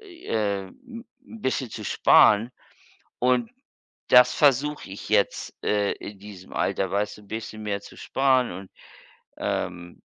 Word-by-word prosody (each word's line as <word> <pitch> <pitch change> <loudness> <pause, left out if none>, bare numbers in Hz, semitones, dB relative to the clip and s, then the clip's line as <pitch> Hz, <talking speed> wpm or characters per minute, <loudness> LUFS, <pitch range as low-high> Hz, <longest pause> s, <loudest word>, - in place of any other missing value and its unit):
äh, 110 - -3
'n 235 - -12 0.4
bisschen 130 - -2
zu - - -7
sparen. 110 +3 +5 0.7
Und 125 - +1 0.6
das 125 0 +7
versuche 145 -3 +2
ich 100 - -9
jetzt, - - +1
äh, 105 -1 +1
in 100 -1 -9
diesem 100 -2 -12
Alter, 95 -2 -1
weißt 105 +1 -2
du, - - -15
bisschen 110 +1 -7
mehr 100 -1 -2
zu - - -14
sparen 130 -2 +1
und, 95 +1 -9 0.7
ähm 85 -1 -4
110 Hz, 130 wpm, -25 LUFS, 100-130 Hz, 0.7 s, das